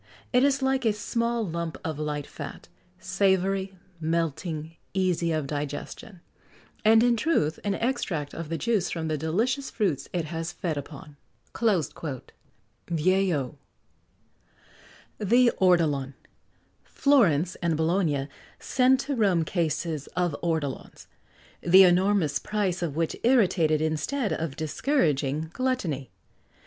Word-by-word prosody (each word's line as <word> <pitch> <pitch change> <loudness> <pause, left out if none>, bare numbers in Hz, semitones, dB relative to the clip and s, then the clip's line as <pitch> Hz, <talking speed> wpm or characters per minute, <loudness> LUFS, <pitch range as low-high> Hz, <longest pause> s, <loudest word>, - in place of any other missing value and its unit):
It 250 +1 +5
is 275 -1 +2
like 265 0 +1
a 220 -2 +3
small 230 +2 -1
lump 170 -1 -4
of 155 -2 -3
light 150 -1 -3
fat - - -9 0.3
savoury, 190 0 0 0.2
melting, 160 0 -2 0.2
easy 180 -3 +1
of 155 -2 -1
digestion; 150 +6 -6 0.6
and, 225 +1 +6
in 240 -1 +4
truth, 215 - +1
an 200 -1 0
extract 195 - -2
of 165 -2 -6
the 165 - -2
juice 215 -4 0
from 160 -2 -3
the 155 - 0
delicious 230 - 0
fruits 190 - -1
it 175 -3 -2
has 165 +1 -4
fed 170 -5 -3
upon." 145 0 -9 0.4
Vieillot. 165 - -1 2.9
THE 240 +4 +4
ORTOLAN. 150 -7 +2 0.7
Florence 185 - +3
and 170 -3 +1
Bologna 160 -4 +1 0.3
sent 260 0 +3
to 280 0 -3
Rome 190 -8 +2
cases 160 -3 -2
of 175 -4 +1
ortolans, 160 -5 -3 0.6
the 185 +2 +7
enormous 180 -4 +3
price 195 -4 -1
of 160 -5 -2
which 165 0 -1
irritated 185 - +3
instead 160 - -1
of 160 -4 -3
discouraging 155 - 0
gluttony. 195 - -2
175 Hz, 115 wpm, -26 LUFS, 155-215 Hz, 2.9 s, the